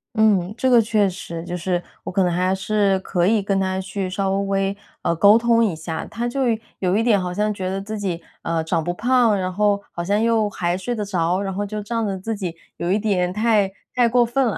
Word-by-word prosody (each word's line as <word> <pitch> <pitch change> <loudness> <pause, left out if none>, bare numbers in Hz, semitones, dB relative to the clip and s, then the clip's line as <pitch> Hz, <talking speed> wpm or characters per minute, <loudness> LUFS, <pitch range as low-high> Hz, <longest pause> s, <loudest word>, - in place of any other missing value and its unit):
嗯， 205 -4 +3
这 260 - +1
个 240 -2 +6
确 215 -2 +2
实， 170 -2 -7
就 175 - -4
是 175 0 -1 0.2
我 - - -5
可 195 - +1
能 180 -1 +2
还 185 +2 +1
是 195 0 +1
可 175 -2 0
以 215 0 +3
跟 195 0 0
他 190 0 -1
去 190 0 -4
稍 195 +1 -1
微， 195 0 0 0.3
呃， 170 - +1
沟 200 +6 +6
通 230 0 +3
一 210 -6 +1
下， 160 0 -5
他 235 +1 -4
就 270 +3 -2 0.4
有 185 +1 +1
一 225 - +2
点 220 -5 +3
好 180 -1 -3
像 210 +2 0
觉 185 -2 -3
得 190 +1 -2
自 215 +2 -5
己， 185 -5 -3 0.2
呃， 165 0 -1
长 160 0 -1
不 175 +2 -2
胖， 235 0 +3
然 185 0 -2
后 205 +1 +2
好 170 - -4
像 200 +4 +1
又 225 -2 +2
还 175 -2 -1
睡 240 +6 -3
得 215 -3 -3
着， 180 -2 0
然 195 -1 -3
后 205 +2 -2
就 210 +1 -4
仗 230 +2 -2
着 195 -2 -2
自 220 +4 -4
己 180 -5 -5 0.2
有 170 +1 -2
一 205 - +2
点 190 -4 0
太 210 -1 +2 0.2
太 245 -2 +4
过 240 +1 +4
分 255 +3 +1
了。 225 - -1
195 Hz, 260 characters per minute, -22 LUFS, 185-220 Hz, 0.4 s, 个